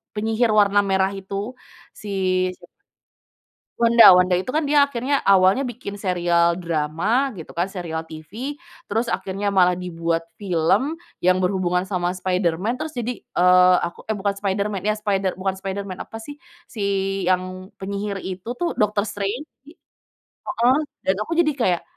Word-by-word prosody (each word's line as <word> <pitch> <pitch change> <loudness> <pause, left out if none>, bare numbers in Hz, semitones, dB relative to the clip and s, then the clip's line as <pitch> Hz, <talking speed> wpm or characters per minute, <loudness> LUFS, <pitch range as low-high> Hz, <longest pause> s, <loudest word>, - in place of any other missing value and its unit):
penyihir 225 +2 +1
warna 205 -1 +4
merah 190 -1 +1
itu 195 +4 -5 0.4
si, 210 - -10 0.5
siapa 175 - -19 1.1
Wanda, 235 0 +7
Wanda 180 0 +4
itu, 190 - -4
kan, 310 - +2
dia 290 -1 +4
akhirnya 275 +1 -1
awalnya 195 +7 +4
bikin 230 -4 -7
serial 175 -3 +2
drama 170 - 0
gitu, 165 -5 -10
kan, 175 +2 -1
serial 170 -4 -5
TV. 185 - -7 0.3
Terus 225 +3 -1
akhirnya 195 +2 -2
malah 180 -2 +4
dibuat 170 -2 -2 0.2
film 195 - +1 0.2
yang 185 +1 +2
berhubungan 180 -1 +1
sama 180 -2 -2
Spiderman, 185 +4 -1
terus 310 +2 -5
jadi, 245 -1 -3
eee, 180 0 +5
aku, 170 - -6
eee, 220 - -1
bukan 200 0 -1
Spiderman, 200 -1 -2
ya, 215 - +2
Spider 200 -3 -1
bukan 190 0 -2
Spiderman 195 -1 -5
apa, 225 - -9
sih, 290 +5 -10 0.3
si 215 - -5 0.4
yang 185 +1 -1
penyihir 200 +1 -4
itu, 190 +6 -5
tuh, 345 +6 -2
Doctor 210 -1 +2
Strange. 205 +9 -4 0.2
Iya, 305 - -14 0.5
heeh, 250 +4 0 0.3
dan 190 - +3
aku 330 +9 -3
jadi 315 -3 +4
kayak, 185 -10 0
195 Hz, 150 wpm, -22 LUFS, 180-225 Hz, 1.1 s, Wanda